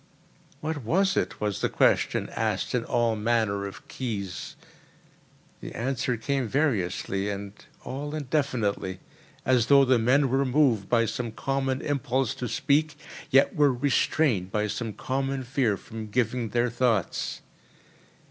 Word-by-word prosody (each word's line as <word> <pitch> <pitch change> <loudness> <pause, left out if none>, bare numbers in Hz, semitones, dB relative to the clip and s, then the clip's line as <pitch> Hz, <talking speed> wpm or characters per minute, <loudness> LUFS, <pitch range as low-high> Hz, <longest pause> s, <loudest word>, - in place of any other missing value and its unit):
"What 155 -1 -3
was 190 - +2
it?" - - -1
was 105 -2 -2
the - - +1
question, - - +2
asked - - -1
in 125 -2 +1
all 120 -2 +1
manner 105 -2 0
of 100 - -11
keys. 100 -8 -5 1.0
The - - -8
answer 125 0 -1
came 135 +2 -1
variously 100 - 0
and 100 0 -5 0.3
all 145 +4 -5
indefinitely 125 -10 -1 0.5
as 125 -3 +3
though 140 -1 +7
the 130 -2 +4
men 130 +4 +3
were 135 +2 +2
moved 125 -7 +2
by 115 -1 +3
some 120 0 -3
common 135 +2 -1
impulse 135 -3 0
to 125 - -1
speak, 145 +4 +1 0.3
yet 135 +1 +4
were 145 -2 +4
restrained 125 - +1
by 105 +1 0
some 110 +1 -3
common 135 +4 -2
fear 125 -5 +1
from 110 +1 -8
giving 120 +1 0
their 120 +2 +1
thoughts. 120 -6 0
125 Hz, 140 wpm, -27 LUFS, 110-135 Hz, 1.0 s, though